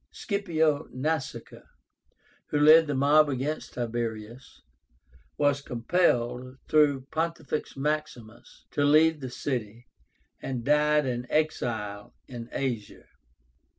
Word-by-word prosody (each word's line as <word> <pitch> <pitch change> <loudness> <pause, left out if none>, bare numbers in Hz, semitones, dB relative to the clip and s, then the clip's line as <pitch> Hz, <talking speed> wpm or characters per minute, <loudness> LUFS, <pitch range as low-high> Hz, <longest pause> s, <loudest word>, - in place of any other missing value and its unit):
SCIPIO 160 -8 -1
NASÍCA, 150 +2 -4 0.9
who 145 - -1
led 155 +2 +7
the 145 - -1
mob 145 +3 +4
against 140 +3 -3
Tiberius, 115 0 -5 0.7
was 145 -1 +2
compelled, 125 -2 0
though 150 -3 +4
Pontifex 160 -3 -3
Maximus, 135 -6 -5
to 145 - 0
leave 155 +2 +4
the 130 -2 -6
city, 120 -3 -4 0.6
and 125 -3 -4
died 150 0 +3
an 125 -1 -3
exile 110 -10 -2
in 120 -2 -8
Asia. 120 -6 -4
140 Hz, 100 wpm, -27 LUFS, 120-155 Hz, 0.9 s, led